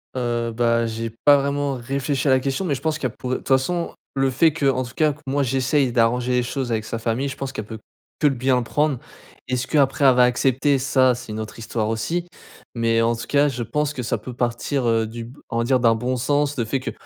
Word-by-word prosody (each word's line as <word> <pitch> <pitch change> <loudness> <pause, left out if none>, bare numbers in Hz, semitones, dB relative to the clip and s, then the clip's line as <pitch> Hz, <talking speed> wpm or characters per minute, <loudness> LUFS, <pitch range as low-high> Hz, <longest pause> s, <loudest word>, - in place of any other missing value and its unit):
Heu, 120 -2 -1
bah, 115 0 +2
j'ai 115 0 -3 0.2
pas 145 -1 +8
vraiment 140 0 -1
réfléchi 135 +3 -2
à - - +5
la 130 - +5
question 135 +8 -2
mais 150 -5 0
je - - -7
pense 155 -1 -1
qu'il 130 - -1
y - - -12
a - - -25
pour 125 - -4
de - - +1
toute - - -13
façon 155 +6 +1 0.2
le 135 0 +2
fait 150 +5 +3
que, 145 -3 0
en 130 -1 +1
tout 120 0 -10
cas 155 -1 +3
que 150 - -19
moi 140 +2 0
j'essaye 130 +1 +1
d'arranger 120 +2 +2
les 125 0 +2
choses 125 0 -3
avec 110 -1 -1
sa 115 - -4
famille, 115 +4 -1
je 130 - -6
pense 135 -1 -4
qu'elle 110 - -5
peut 110 +1 -8 0.4
que 150 - +4
bien 130 -1 +2
le - - -2
prendre. 145 +1 0 0.5
Est-ce 125 0 -1
que 155 - -1
après 140 +1 +2
elle 130 - +7
va 125 - +5
accepter? 130 +3 +2
Ça, 130 -1 +3
c'est 120 -2 -9
une 105 - -4
autre 110 -1 -7
histoire 110 -1 -2
aussi, 165 +11 -2 0.5
mais 115 -1 +2
en 115 +1 +2
tout 115 - -6
cas 145 0 +3
je 125 -3 -4
pense 150 +5 -1
que 125 - -5
ça 115 - -1
peut 125 - -8
partir, 125 +2 -1
heu, 115 -1 +2
du 115 +1 -7
b 125 +5 -13
on 115 - -2
va 115 - +1
dire 130 +2 +2
d'un 115 -2 +4
bon 125 +3 -1
sens, 145 +3 0
le 115 - 0
fait 135 +5 -1
que 130 - -4
130 Hz, 265 wpm, -22 LUFS, 115-140 Hz, 0.5 s, pas